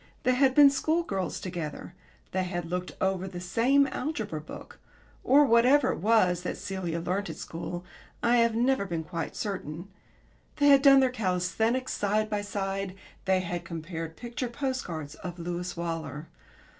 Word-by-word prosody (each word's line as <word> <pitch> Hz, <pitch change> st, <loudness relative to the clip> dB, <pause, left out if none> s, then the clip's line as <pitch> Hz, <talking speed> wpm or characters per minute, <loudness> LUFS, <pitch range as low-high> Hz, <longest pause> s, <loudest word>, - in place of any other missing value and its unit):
They 255 Hz, -, +3 dB
had 265 Hz, 0 st, +3 dB
been 285 Hz, -2 st, +8 dB
schoolgirls 275 Hz, -, -1 dB
together; 170 Hz, -2 st, -6 dB, 0.4 s
they 185 Hz, 0 st, 0 dB
had 175 Hz, -2 st, -3 dB
looked 180 Hz, 0 st, -3 dB
over 190 Hz, 0 st, 0 dB
the 180 Hz, -2 st, -6 dB
same 235 Hz, +10 st, +3 dB
algebra 245 Hz, -, -3 dB
book 155 Hz, -, -11 dB, 0.4 s
(or 290 Hz, +2 st, +6 dB
whatever 255 Hz, +3 st, +5 dB
it -, -, -4 dB
was 185 Hz, -3 st, +3 dB
that 180 Hz, -, -4 dB
Celia 180 Hz, -4 st, -3 dB
learnt 185 Hz, +4 st, -2 dB
at -, -, -5 dB
school 175 Hz, +1 st, -6 dB, 0.4 s
I 240 Hz, +1 st, +4 dB
have 230 Hz, -1 st, +3 dB
never 245 Hz, -2 st, +2 dB
been 170 Hz, -4 st, -3 dB
quite 165 Hz, +1 st, -5 dB
certain); 185 Hz, -3 st, -5 dB, 0.7 s
they 290 Hz, -1 st, +4 dB
had 275 Hz, -1 st, +7 dB
done 275 Hz, -1 st, +7 dB
their 260 Hz, -1 st, +3 dB
calisthenics 220 Hz, +4 st, 0 dB
side 215 Hz, +1 st, 0 dB
by 205 Hz, -1 st, 0 dB
side; 195 Hz, -1 st, -3 dB, 0.3 s
they 190 Hz, -1 st, +3 dB
had 175 Hz, -1 st, -4 dB
compared 165 Hz, -1 st, -6 dB
picture 240 Hz, +1 st, -4 dB
post 260 Hz, +1 st, -2 dB
cards 155 Hz, -4 st, -6 dB
of 175 Hz, +1 st, -8 dB
Lewis 175 Hz, +1 st, -4 dB
Waller. 165 Hz, -2 st, -4 dB
195 Hz, 160 wpm, -28 LUFS, 175-245 Hz, 0.7 s, been